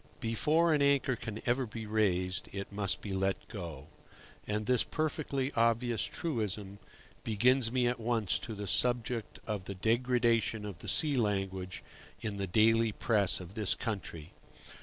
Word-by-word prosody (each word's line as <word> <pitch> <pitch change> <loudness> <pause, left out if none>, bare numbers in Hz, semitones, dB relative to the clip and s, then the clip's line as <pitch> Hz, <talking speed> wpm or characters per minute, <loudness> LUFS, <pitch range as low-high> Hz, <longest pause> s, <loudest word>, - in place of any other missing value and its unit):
BEFORE 150 +8 +2
an 150 - +2
anchor 140 -2 +3
can 110 -1 -7
ever 125 +1 +1
be 110 +1 -7
raised, 95 -4 0
it 100 0 -6
must 100 -1 -1
be 100 - -5
let 95 0 -1
go; 85 -9 -7 0.6
and 105 +1 -1
this 125 +1 +3
perfectly 145 -3 -2
obvious 115 0 +2
truism 105 - -3 0.4
brings 115 +2 +3
me 125 -1 +2
at 120 0 0
once 115 -4 0
to 110 - -6
the 105 0 -5
subject 120 +1 +1
of 105 -4 -3
the 100 - -5
degradation 115 0 +1
of 100 -4 -7
the - - -9
sea 150 -4 +5
language 95 -4 -2 0.4
in 105 -2 -4
the 100 -1 -2
daily 115 +4 +4
press 105 -2 +2
of 90 0 -10
this 105 -3 +1
country. 85 -7 -5
110 Hz, 155 wpm, -32 LUFS, 100-125 Hz, 0.6 s, sea